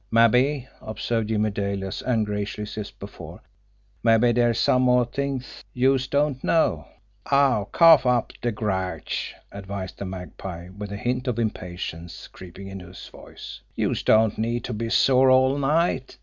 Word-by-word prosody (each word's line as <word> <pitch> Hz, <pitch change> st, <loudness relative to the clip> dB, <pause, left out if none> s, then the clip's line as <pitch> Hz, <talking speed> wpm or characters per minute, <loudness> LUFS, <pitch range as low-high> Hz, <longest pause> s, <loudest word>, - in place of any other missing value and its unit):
"Mabbe," 125 Hz, +4 st, +3 dB
observed 110 Hz, 0 st, -3 dB
Jimmie 110 Hz, -1 st, +1 dB
Dale, 100 Hz, -1 st, -3 dB
as 95 Hz, -, -5 dB
ungraciously 105 Hz, -2 st, -2 dB
as 100 Hz, -, -7 dB
before, -, -, -11 dB, 0.6 s
"mabbe 115 Hz, +1 st, +4 dB
dere's 120 Hz, -1 st, +2 dB
some 125 Hz, -, +3 dB
more 125 Hz, -1 st, +4 dB
t'ings 135 Hz, 0 st, -5 dB
youse 130 Hz, +1 st, +2 dB
don't 140 Hz, -1 st, 0 dB
know!" 165 Hz, -, +1 dB, 0.4 s
"Aw, 140 Hz, -7 st, +3 dB
cough 160 Hz, +3 st, +6 dB
up 125 Hz, -2 st, +1 dB
de 120 Hz, -, 0 dB
grouch!" 95 Hz, -6 st, -3 dB, 0.2 s
advised 100 Hz, -1 st, -7 dB
the 100 Hz, -, -4 dB
Magpie, 90 Hz, -1 st, -8 dB
with 100 Hz, +1 st, -8 dB
a 100 Hz, -, -4 dB
hint 125 Hz, +4 st, -2 dB
of 120 Hz, -3 st, -1 dB
impatience 90 Hz, -6 st, -5 dB
creeping 95 Hz, +2 st, -11 dB
into 95 Hz, -2 st, -9 dB
his 90 Hz, -, -11 dB
voice. -, -, -11 dB
"Youse -, -, -1 dB
don't 110 Hz, -1 st, +3 dB
need 115 Hz, +1 st, -1 dB
to 120 Hz, -, -4 dB
be 115 Hz, +1 st, -3 dB
sore 130 Hz, +2 st, +4 dB
all 130 Hz, +2 st, +4 dB
night! 145 Hz, -1 st, 0 dB
115 Hz, 150 wpm, -24 LUFS, 100-130 Hz, 0.6 s, cough